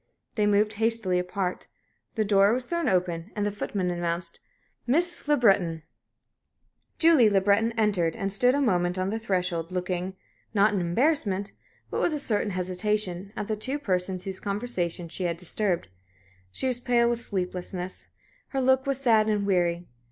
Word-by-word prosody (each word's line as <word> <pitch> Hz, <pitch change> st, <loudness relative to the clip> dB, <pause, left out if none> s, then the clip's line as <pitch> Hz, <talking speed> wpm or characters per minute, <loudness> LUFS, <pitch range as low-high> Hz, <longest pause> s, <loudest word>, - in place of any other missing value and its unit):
They 210 Hz, -2 st, +1 dB
moved 210 Hz, +1 st, +3 dB
hastily 220 Hz, -5 st, +2 dB
apart. 180 Hz, 0 st, -3 dB, 0.5 s
The 220 Hz, -2 st, +1 dB
door 200 Hz, +1 st, +4 dB
was 250 Hz, +1 st, 0 dB
thrown 340 Hz, +2 st, -1 dB
open, 180 Hz, 0 st, -1 dB
and 205 Hz, -1 st, -1 dB
the 205 Hz, -, 0 dB
footman 195 Hz, -2 st, -2 dB
announced, 170 Hz, 0 st, -3 dB, 0.5 s
"Miss 345 Hz, +5 st, +1 dB
Le 295 Hz, 0 st, +4 dB
Breton." 180 Hz, -, +2 dB, 1.1 s
Julie 320 Hz, -9 st, +6 dB
Le 200 Hz, -1 st, +3 dB
Breton 205 Hz, +4 st, +2 dB
entered, 200 Hz, -7 st, +1 dB
and 195 Hz, -, -2 dB
stood 245 Hz, +6 st, +3 dB
a 285 Hz, -, +1 dB
moment 180 Hz, -7 st, +1 dB
on 185 Hz, +1 st, -1 dB
the 225 Hz, -, -2 dB
threshold, 180 Hz, -5 st, -2 dB
looking, 180 Hz, +1 st, -3 dB, 0.4 s
not 205 Hz, +1 st, +4 dB
in 195 Hz, -, 0 dB
embarrassment, 200 Hz, -, +1 dB, 0.4 s
but -, -, -1 dB
with 320 Hz, -, +1 dB
a -, -, -1 dB
certain 215 Hz, -7 st, -1 dB
hesitation, 185 Hz, +1 st, -1 dB
at 210 Hz, -2 st, -4 dB
the 215 Hz, -, -1 dB
two 260 Hz, +7 st, -2 dB
persons 185 Hz, -7 st, -1 dB
whose 190 Hz, -1 st, -5 dB
conversation 195 Hz, -5 st, -3 dB
she 180 Hz, +2 st, -4 dB
had 170 Hz, -1 st, -1 dB
disturbed. 180 Hz, +1 st, -1 dB, 0.6 s
She 95 Hz, -, -3 dB
was 250 Hz, -2 st, +1 dB
pale 240 Hz, -1 st, +2 dB
with 235 Hz, 0 st, 0 dB
sleeplessness; 180 Hz, -2 st, -4 dB, 0.4 s
her 270 Hz, -, -3 dB
look 260 Hz, +1 st, +3 dB
was 275 Hz, -1 st, 0 dB
sad 225 Hz, -5 st, +4 dB
and 205 Hz, -2 st, +1 dB
weary. 175 Hz, -3 st, +1 dB
200 Hz, 165 wpm, -27 LUFS, 180-230 Hz, 1.1 s, Julie